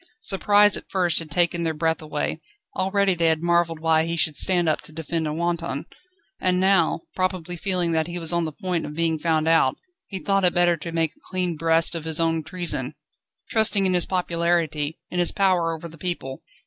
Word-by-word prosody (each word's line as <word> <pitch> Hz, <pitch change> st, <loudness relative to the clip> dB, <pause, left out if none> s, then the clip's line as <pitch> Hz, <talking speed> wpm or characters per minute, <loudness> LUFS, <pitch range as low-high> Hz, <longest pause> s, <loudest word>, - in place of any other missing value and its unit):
Surprise 205 Hz, -, +4 dB
at -, -, -7 dB
first 175 Hz, -4 st, +2 dB
had 165 Hz, -2 st, -7 dB
taken 170 Hz, +1 st, +1 dB
their 165 Hz, -1 st, -1 dB
breath 160 Hz, +1 st, 0 dB
away. 150 Hz, -1 st, -3 dB, 0.3 s
Already 195 Hz, 0 st, +1 dB
they 170 Hz, -1 st, +1 dB
had 160 Hz, 0 st, +1 dB
marvelled 170 Hz, -1 st, +1 dB
why 160 Hz, 0 st, +2 dB
he 170 Hz, 0 st, -3 dB
should 155 Hz, -2 st, +2 dB
stand 175 Hz, 0 st, +2 dB
up 155 Hz, -, +1 dB
to -, -, -8 dB
defend 160 Hz, 0 st, -3 dB
a -, -, -2 dB
wanton. 170 Hz, -2 st, -2 dB, 0.5 s
And 180 Hz, 0 st, +1 dB
now, 190 Hz, -4 st, +2 dB
probably 185 Hz, -2 st, -2 dB
feeling 180 Hz, -1 st, 0 dB
that 160 Hz, -1 st, 0 dB
he 175 Hz, 0 st, -5 dB
was 165 Hz, -1 st, +1 dB
on 170 Hz, -1 st, +1 dB
the 155 Hz, -, -4 dB
point 180 Hz, +1 st, -3 dB
of 150 Hz, -, -8 dB
being 165 Hz, -1 st, 0 dB
found 160 Hz, -1 st, 0 dB
out, 165 Hz, -5 st, +3 dB, 0.3 s
he 195 Hz, -, -5 dB
thought 195 Hz, +3 st, 0 dB
it 180 Hz, -, +3 dB
better 175 Hz, 0 st, +4 dB
to 165 Hz, +1 st, -7 dB
make 165 Hz, -2 st, 0 dB
a -, -, -30 dB
clean 180 Hz, -2 st, -1 dB
breast 165 Hz, +1 st, +2 dB
of 165 Hz, -2 st, -5 dB
his 160 Hz, -1 st, -1 dB
own 165 Hz, -1 st, +1 dB
treason, 160 Hz, -5 st, -4 dB, 0.6 s
trusting 220 Hz, -3 st, +3 dB
in 185 Hz, -, +1 dB
his 175 Hz, -1 st, +2 dB
popularity, 170 Hz, -4 st, -1 dB
in 180 Hz, -, -2 dB
his 175 Hz, -, +4 dB
power 185 Hz, -4 st, +2 dB
over 165 Hz, +1 st, -6 dB
the 165 Hz, -1 st, -14 dB
people. 160 Hz, -7 st, -4 dB
170 Hz, 210 wpm, -23 LUFS, 160-180 Hz, 0.6 s, Surprise